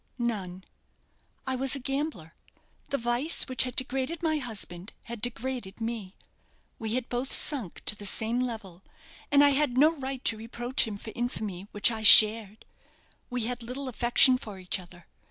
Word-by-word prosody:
"None. 195 -7 -4 0.8
I 260 -1 0
was 265 +2 +3
a - - -4
gambler; 270 - -4 0.6
the 280 - -1
vice 240 +6 +1
which 260 -1 0
had 250 - -7
degraded 265 +6 -2
my 315 -2 0
husband 205 -7 -5
had 235 -2 -9
degraded 245 -3 -5
me. 225 -4 -6 0.6
We 220 0 -3
had 255 -2 -3
both 250 +2 -4
sunk 255 - -3
to - - +4
the 205 -1 -4
same 225 +5 -1
level, 220 -8 -6 0.5
and 285 0 +5
I 285 - +6
had 275 -3 +1
no 310 +4 +4
right 270 -2 -7
to 225 - +2
reproach 240 +2 -3
him 210 -2 -6
for 220 - -9
infamy 210 -6 -5
which 205 +3 +2
I 220 -1 -5
shared. 215 0 +7 0.6
We 245 -2 -3
had 245 +1 -4
little 255 +4 -6
affection 250 +1 +4
for 210 -5 -10
each 185 0 -3
other. 175 -1 -16
240 Hz, 170 wpm, -27 LUFS, 210-260 Hz, 0.8 s, shared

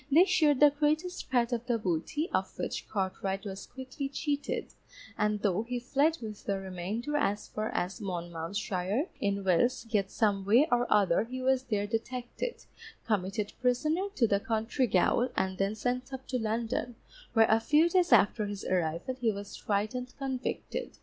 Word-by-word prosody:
They 330 +6 +7
shared 310 -7 +3
the 295 -1 +8
greatest 310 +5 -1
part 240 -2 +2
of 240 0 -2
the 240 -2 +2
booty, 210 - -1
of - - -1
which - - -4
Cartwright 195 0 -2
was 195 -1 -6
quickly 260 +2 -6
cheated, 285 0 -2 0.4
and 210 0 0
though 200 -1 +2
he 245 +2 -3
fled 285 +6 +2
with 215 -2 -7
the 200 -1 -1
remainder 195 +9 -4
as 210 -7 0
far 215 +1 -3
as 190 +6 -2
Monmouthshire, 185 - -2
in 200 0 0
Wales, 215 +8 +2
yet 200 -3 +1
some 205 -4 +1
way 235 +10 +5
or 245 0 +2
other 205 -1 +4
he 255 +2 -6
was 260 0 +2
there 205 -3 0
detected, 245 - -4 0.4
committed 205 -1 -1
prisoner 305 +10 +1
to 240 - +4
the 200 -2 +2
county 225 +4 0
gaol 235 +6 +3
and 190 0 -1
then 195 +2 +1
sent 250 +4 -2
up 265 0 -6
to 255 - 0
London, 230 +2 -2 0.4
where 225 -1 +6
a 220 - +4
few 300 +8 +4
days 355 0 +2
after 210 +1 +4
his 200 -1 -6
arrival 170 +5 0
he 230 -2 +3
was 200 0 -7
tried 205 +2 -1
and 250 0 -6
convicted. 270 - -4
225 Hz, 170 wpm, -30 LUFS, 200-260 Hz, 0.4 s, the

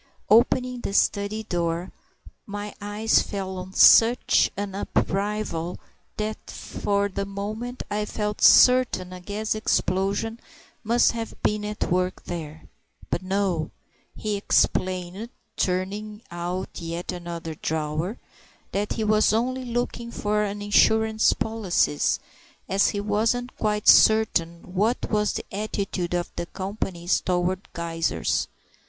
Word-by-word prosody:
Opening 250 +2 +3
the 195 - -4
study 205 +2 +1
door, 170 -2 -2 0.6
my 205 0 -5
eyes 210 +2 +2
fell 190 -2 -4
on 185 +1 -8
such 235 +4 +6
an 200 -1 -3
upheaval 195 -3 -2 0.4
that 215 0 -4
for 200 0 -1
the 200 0 -3
moment 215 +5 -5
I 210 0 -2
felt 210 0 -3
certain 250 -8 +5
a 180 - -8
gas 210 +3 -2
explosion 215 +1 0 0.4
must 235 +2 +3
have 230 -1 -5
been 210 0 +1
at 210 -3 -3
work 180 +1 0
there. 160 -3 -6 0.5
But - - 0
no! 185 -4 -1 0.5
He 210 -1 -2
explained 185 +1 0 0.3
(turning 205 +4 -2
out 175 +2 -4
yet 170 +2 -4
another 170 -2 -6
drawer) 155 +6 -2 0.5
that 205 +1 -1
he 220 - -2
was 215 0 +3
only 255 +4 0
looking 240 0 -3
for 210 -2 0
some 205 +1 -6
insurance 220 +1 +4
policies, 205 -9 0 0.5
as 195 +1 +3
he 205 - -2
wasn't 225 +4 0
quite 210 -1 -1
certain 180 -6 +4
what 215 +6 0
was 210 -1 +1
the - - -4
attitude 195 -3 -2
of 175 0 -2
the 170 0 -3
companies 190 -2 -2
towards 180 +1 0
geysers. 165 -1 -1
200 Hz, 125 wpm, -25 LUFS, 180-215 Hz, 0.6 s, such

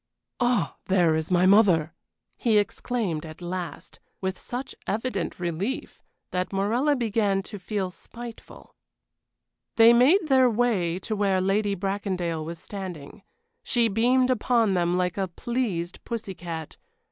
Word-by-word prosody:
"Ah, 245 -7 +1
there 180 -4 +3
is 160 0 -1
my 180 0 +3
mother!" 185 -5 +5 0.4
he 225 -3 +2
exclaimed, 205 -5 -1
at 155 -1 -10
last, 175 -3 -6 0.2
with 190 0 -2
such 250 +7 -5
evident 210 -5 -2
relief 180 - -3 0.3
that 180 0 -2
Morella 230 +9 +1
began 210 -5 +1
to 205 +1 -8
feel 190 -1 -3
spiteful. 235 +6 -11 1.0
They 230 +1 +8
made 305 +10 +5
their 260 -3 +5
way 210 -7 +1
to 215 - -3
where 200 -2 +2
Lady 200 +2 +1
Bracondale 185 -4 -2
was 165 +2 -6
standing. 185 -1 -8 0.4
She 235 -2 +2
beamed 250 +5 +3
upon 230 -3 +2
them 175 -1 +1
like 180 +1 -1
a 190 - 0
pleased 190 -4 -3
pussy 220 -4 -4
cat. 165 -3 -7
195 Hz, 135 wpm, -26 LUFS, 180-235 Hz, 1.0 s, They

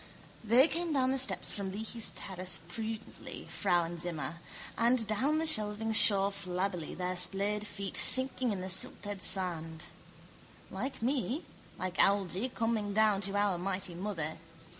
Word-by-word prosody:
They 240 +6 +5
came 335 0 -2
down 260 -2 +2
the 270 - +1
steps 265 - +2
from 195 -2 -4
Leahy's 220 +3 0
terrace 185 -1 -1
prudently, 220 +4 -6
Frauenzimmer: 170 -1 -2 0.4
and 235 0 +2
down 255 +9 +1
the 320 - 0
shelving 220 -5 +1
shore 200 -2 +5
flabbily, 180 -3 -3
their 180 +1 -3
splayed 200 +3 0
feet 200 -2 -6
sinking 260 -2 +6
in 195 -3 -3
the 185 - -5
silted 200 +1 -1
sand. 170 -4 -1 0.9
Like 225 +5 -5
me, 265 +4 -1 0.3
like 185 -1 -5
Algy, 200 +3 +2
coming 225 -4 -2
down 215 -2 +3
to 200 0 0
our 200 -3 +1
mighty 185 -1 -2
mother. 170 -4 -5
200 Hz, 140 wpm, -31 LUFS, 185-230 Hz, 0.9 s, sinking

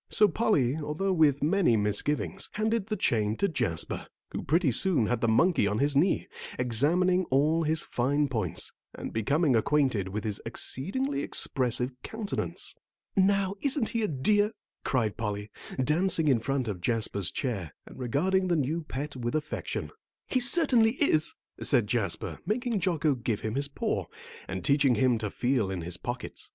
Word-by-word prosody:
So 210 - +5
Polly, 155 - +1
although 160 +6 -2
with 150 -5 +3
many 165 - +3
misgivings, 145 - -1
handed 220 -1 -1
the 215 - -1
chain 110 - +1
to 200 - +2
Jasper, 120 - -2 0.2
who - - -4
pretty 160 0 +2
soon 155 - +4
had 120 +1 -1
the 115 - +2
monkey 115 - +3
on 105 +1 -1
his 140 +3 +1
knee, 170 +7 +2 0.3
examining 170 +10 +2
all 150 +5 +2
his 160 0 +1
fine 145 +4 0
points, 110 -10 -2 0.2
and - - -7
becoming 140 +6 +2
acquainted 125 -4 +1
with 105 +2 -4
his 105 -2 -4
exceedingly 260 - -2
expressive 125 -1 +1
countenance. 220 -2 -3 0.4
"Now, 195 0 +2
isn't 275 -4 +1
he 230 - -1
a 215 - +1
dear?" 205 +9 +2 0.3
cried 115 -6 0
Polly, 105 -1 -4 0.3
dancing 165 +2 +2
in 130 -5 +4
front 130 +1 -2
of 95 -5 -4
Jasper's 110 -3 0
chair, 100 - -3
and - - -13
regarding 185 +10 +1
the 175 - +2
new 155 +3 -1
pet 145 -1 -6
with 120 0 -3
affection. 150 -1 -3 0.3
"He 255 - 0
certainly 245 -4 +5
is," 255 - +1 0.3
said 120 -6 +2
Jasper, 105 -4 -2
making 235 0 0
Jocko 165 -4 +1
give 115 -4 -3
him 110 - -3
his 140 +2 +1
paw, 140 - -2 0.4
then 95 -1 -5
teaching 140 0 +3
him 125 -3 +2
to 105 -2 -3
feel 120 -3 0
in 95 -2 -3
his 85 +1 -3
pockets. 125 +1 -6
140 Hz, 165 wpm, -28 LUFS, 115-185 Hz, 0.4 s, So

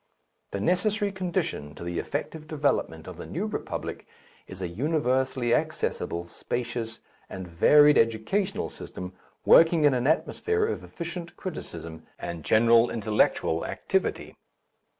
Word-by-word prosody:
The 100 - -4
necessary 200 - +1
condition 175 - -3
to - - -9
the 85 0 -3
effective 155 -1 -4
development 140 - -1
of - - -9
the - - -8
New - - -3
Republic - - -5 0.4
is 95 - -9
a 90 - -2
universally 130 - 0
accessible, 85 0 -1
spacious, 120 +3 -4 0.3
and 95 -1 -7
varied 145 - +6
educational 115 - 0
system 90 0 -8 0.3
working 165 -1 +6
in 145 -2 +5
an 125 +1 0
atmosphere 435 - +1
of 445 - -3
efficient 170 0 -7
criticism 85 - -7 0.2
and 85 -2 -6
general 115 +4 +5
intellectual 105 -6 +1
activity. - - -2
125 Hz, 125 wpm, -27 LUFS, -, 0.4 s, varied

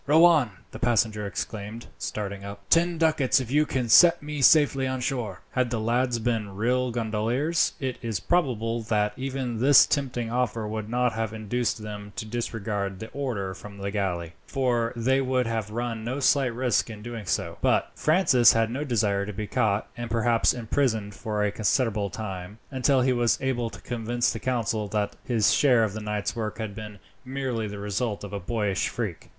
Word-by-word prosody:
"Row 160 +4 +7
on," 155 -9 +5 0.2
the - - -8
passenger 110 -3 +1
exclaimed, 105 +4 -5
starting 100 -2 -4
up. 100 0 -8
"Ten 170 +1 +4
ducats 155 -5 +3
if 130 -2 -5
you 150 +2 +3
can 125 -2 -1
set 170 +8 +7
me 150 -1 -4
safely 135 -1 +5
on 130 0 -2
shore." 120 -7 -3
Had 125 -2 0
the 120 -2 -2
lads 120 +2 +1
been 110 -4 -2
real 125 +4 +1
gondoliers, 120 +7 0
it 130 -2 -3
is 115 -6 -2
probable 120 - 0
that 105 -2 0
even 130 -3 -3
this 140 +3 +7
tempting 125 -5 -2
offer 115 -3 -1
would 110 0 -4
not 125 0 +1
have 110 -1 -3
induced 110 +1 -2
them 105 -1 -7
to - - -4
disregard 105 -4 -3
the 110 - -7
order 115 -9 -3
from 100 +2 -11
the 100 0 -4
galley, 90 -5 -2
for 120 -4 0
they 130 +3 +2
would 130 -1 +1
have 110 -2 -2
run 115 0 -3
no 125 +5 -3
slight 135 -2 +3
risk 125 -2 +1
in 105 -2 -9 0.2
so - - +1
doing. - - -12
But - - +2
Francis 155 -7 +5
had 115 0 +1
no 135 +5 -2
desire 100 -7 0
to 105 - -5
be 105 +2 -4
caught, 105 0 0
and 120 -1 -5
perhaps 115 0 +3
imprisoned 110 -3 -1
for 105 +1 -2
a 105 - +1
considerable 110 -1 0
time, 95 -1 -6
until 130 0 +2
he 130 0 +3
was 120 -1 +2
able 125 -3 -1
to - - -11
convince 120 0 -1
the 115 - -5
council 115 -4 -1
that 105 0 -2
his 115 -4 +2
share 125 -5 +4
of 105 -3 -1
the 110 - -5
night's 105 -4 -3
work 110 -2 -3
had 110 -2 -4
been 105 0 -8 0.3
merely 130 -4 -3
the 105 0 -7
result 105 +1 -2
of 100 -1 -7
a 100 - -2
boyish 105 +1 -1
freak. - - -5
115 Hz, 190 wpm, -26 LUFS, 105-130 Hz, 0.3 s, Row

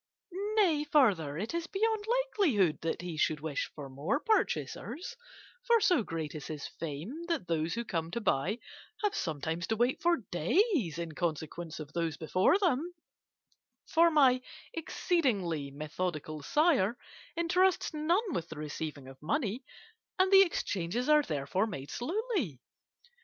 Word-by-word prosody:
Nay, 340 -9 +4
further, 200 - +3
it 210 - -3
is 335 -1 -2
beyond 435 +1 0
likelihood 380 - +2
that 165 +1 -2
he 175 -3 -5
should 155 0 +1
wish 150 -2 -3
for 145 -2 -7
more 145 - -1
purchasers, 435 -1 -1 0.5
for 470 -2 +4
so 360 - +4
great 165 -7 -4
is 150 -2 -7
his 150 -2 -5
fame 160 - -6
that 330 - -1
those 165 +1 0
who 235 0 -3
come 165 -5 -2
to 205 - -3
buy 195 0 +1 0.5
have 415 - +2
sometimes 160 +2 -2
to 220 - +1
wait 240 +3 +1
for 345 +1 +3
days 205 - +2
in 170 -1 -4
consequence 160 0 -3
of 150 -1 -8
those 165 -2 -1
before 185 - +3
them; 350 -2 0 0.9
for 335 +1 +5
my 265 -5 +5 0.3
exceedingly 210 - 0
methodical 155 +1 -4
sire 250 - +2 0.4
entrusts 360 +2 +2
none 340 +6 +1
with 165 -8 -3
the 160 - -8
receiving 150 -2 -5
of 135 0 -13
money, 235 - -1 0.5
and 375 0 +3
the 390 0 +9
exchanges 235 - 0
are 300 0 +7
therefore 155 - -1
made 145 -9 -6
slowly. 335 - -2
205 Hz, 145 wpm, -31 LUFS, -, 0.9 s, the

